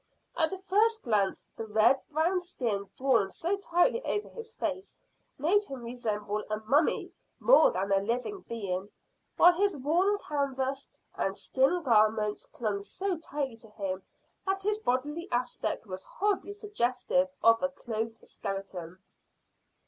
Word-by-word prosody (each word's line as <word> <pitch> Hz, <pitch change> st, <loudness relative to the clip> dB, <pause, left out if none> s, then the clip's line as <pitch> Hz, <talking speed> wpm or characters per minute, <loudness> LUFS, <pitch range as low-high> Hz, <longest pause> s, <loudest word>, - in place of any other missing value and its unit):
At 320 Hz, -2 st, +3 dB
the 380 Hz, -, -5 dB
first 425 Hz, +4 st, +2 dB
glance 210 Hz, -4 st, +1 dB
the 225 Hz, -, -6 dB
red 220 Hz, +5 st, +4 dB
brown 330 Hz, +5 st, +2 dB
skin 230 Hz, -, -3 dB
drawn 245 Hz, -7 st, +3 dB
so 340 Hz, -, -1 dB
tightly 395 Hz, +6 st, +2 dB
over 415 Hz, -, -1 dB
his 460 Hz, -1 st, -8 dB
face 390 Hz, -4 st, -4 dB, 0.4 s
made 390 Hz, +9 st, +3 dB
him 270 Hz, -7 st, -7 dB
resemble 215 Hz, -3 st, -3 dB
a 215 Hz, -, 0 dB
mummy 280 Hz, +9 st, +2 dB, 0.3 s
more -, -, +7 dB
than 195 Hz, +2 st, -2 dB
a 195 Hz, -, +5 dB
living 245 Hz, -, -2 dB
being, 200 Hz, -4 st, -3 dB, 0.5 s
while 350 Hz, +1 st, +8 dB
his 395 Hz, -1 st, +1 dB
worn 350 Hz, +9 st, +2 dB
canvas 275 Hz, -5 st, -2 dB, 0.2 s
and 195 Hz, 0 st, -2 dB
skin 275 Hz, +7 st, +1 dB
garments 215 Hz, -3 st, +3 dB
clung 210 Hz, -4 st, -2 dB
so 375 Hz, -, -2 dB
tightly 280 Hz, -6 st, -4 dB
to 225 Hz, -1 st, -12 dB
him 195 Hz, -3 st, -4 dB, 0.5 s
that 385 Hz, 0 st, 0 dB
his 425 Hz, +1 st, +1 dB
bodily 295 Hz, -, -1 dB
aspect 245 Hz, -2 st, -1 dB
was 185 Hz, -2 st, -6 dB
horribly 405 Hz, 0 st, -1 dB
suggestive 275 Hz, -, 0 dB
of 230 Hz, 0 st, +6 dB
a 275 Hz, -, +1 dB
clothed 225 Hz, -4 st, -5 dB
skeleton. 185 Hz, -3 st, -5 dB
265 Hz, 140 wpm, -30 LUFS, -, 0.5 s, while